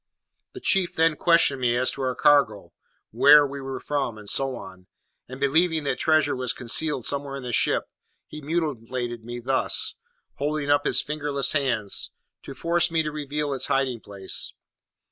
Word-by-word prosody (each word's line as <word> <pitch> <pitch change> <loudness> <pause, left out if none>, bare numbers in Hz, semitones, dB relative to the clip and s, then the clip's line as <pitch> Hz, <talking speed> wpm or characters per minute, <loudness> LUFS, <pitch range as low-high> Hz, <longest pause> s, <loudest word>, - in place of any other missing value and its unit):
"The 380 - -8
chief 195 - +1
then 165 -1 +3
questioned 160 -5 +3
me 120 -1 +2
as 125 +1 +1
to - - -7
our 130 -1 -1
cargo, 110 -12 +2 0.4
where 150 0 +7
we 140 0 -6
were 135 -1 -5
from, 140 -6 -3
and 105 -1 -12
so 135 +4 0
on; 95 -4 -11 0.4
and 130 +1 -8
believing 160 +3 +2
that 140 -3 -2
treasure 155 -2 +2
was 130 -1 -2
concealed 135 +2 -1
somewhere 140 -1 -1
in 135 - -7
the 125 -1 -5
ship, - - +2 0.4
he 155 - -10
mutilated 130 -7 -3
me 120 +1 -6
thus," 130 +2 +1 0.4
holding 145 0 -1
up 145 0 +2
his - - +2
fingerless 145 -2 -1
hands, 120 -9 -1 0.3
"to 135 - -10
force 170 +5 +1
me 165 -1 +1
to 150 - -3
reveal 150 -1 -3
its 135 - -1
hiding 130 -3 0
place. 100 -2 -3
140 Hz, 170 wpm, -24 LUFS, 125-150 Hz, 0.4 s, where